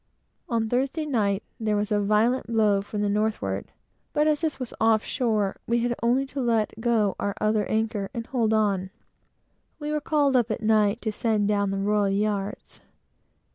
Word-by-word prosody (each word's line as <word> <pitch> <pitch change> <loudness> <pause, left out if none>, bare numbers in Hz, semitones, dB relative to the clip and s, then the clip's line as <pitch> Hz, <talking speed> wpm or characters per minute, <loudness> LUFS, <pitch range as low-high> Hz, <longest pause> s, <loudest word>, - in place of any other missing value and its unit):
On 230 -2 0
Thursday 270 +7 -1
night, 210 -8 0 0.2
there 215 -2 0
was 210 +1 -1
a 210 - +3
violent 215 +6 +2
blow 215 -3 +2
from 205 +1 -4
the - - +1
northward, 200 - -1 0.4
but 300 - +2
as 305 -1 +2
this 315 -4 -2
was 255 -2 -5
off 225 -1 +4
shore, 215 -6 0
we 235 0 +1
had 240 0 0
only 245 +4 +2
to 275 0 -5
let 230 -3 +1
go 225 -4 +2
our 200 -1 -2
other 215 -1 +1
anchor 220 -3 -1
and 230 -1 -5
hold 230 -4 0
on. 200 -4 +1 0.9
We 300 -1 -4
were 300 0 -1
called 285 -3 +2
up 240 -2 +3
at 220 +1 -3
night 215 0 +2
to 220 - -1
send 215 -1 0
down 200 -1 +1
the 195 - -2
royal 205 0 +1
yards. 200 0 -2
220 Hz, 180 wpm, -25 LUFS, 205-240 Hz, 0.9 s, off